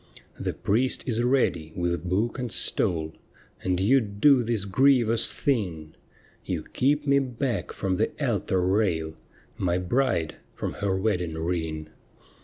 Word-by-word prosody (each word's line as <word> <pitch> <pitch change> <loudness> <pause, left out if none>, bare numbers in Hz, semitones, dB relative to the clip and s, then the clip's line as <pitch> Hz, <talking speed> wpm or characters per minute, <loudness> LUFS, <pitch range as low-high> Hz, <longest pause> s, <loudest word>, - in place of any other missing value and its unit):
' - - -29
The - - -2
priest 125 +6 0
is 120 -2 -1
ready 120 -11 +1
with 85 0 -2
book 110 +8 0
and 125 -3 -3
stole, 80 -5 +2 0.5
And 90 -1 0
you 120 +8 +4
do 115 +6 +3
this 115 -4 -1
grievous 120 +1 +3
thing: 90 - -2 0.5
You - - -3
keep 145 +3 0
me 140 -1 +4
back 125 - -2
from 95 -1 -2
the - - +1
altar 95 -1 0
rail 90 -5 0 0.3
— - - -31
My 90 -2 +1
bride 90 - 0 0.2
from - - -4
her 100 -2 -1
wedding 90 -6 -1
ring.' 80 -2 -3
100 Hz, 145 wpm, -26 LUFS, 85-125 Hz, 0.5 s, you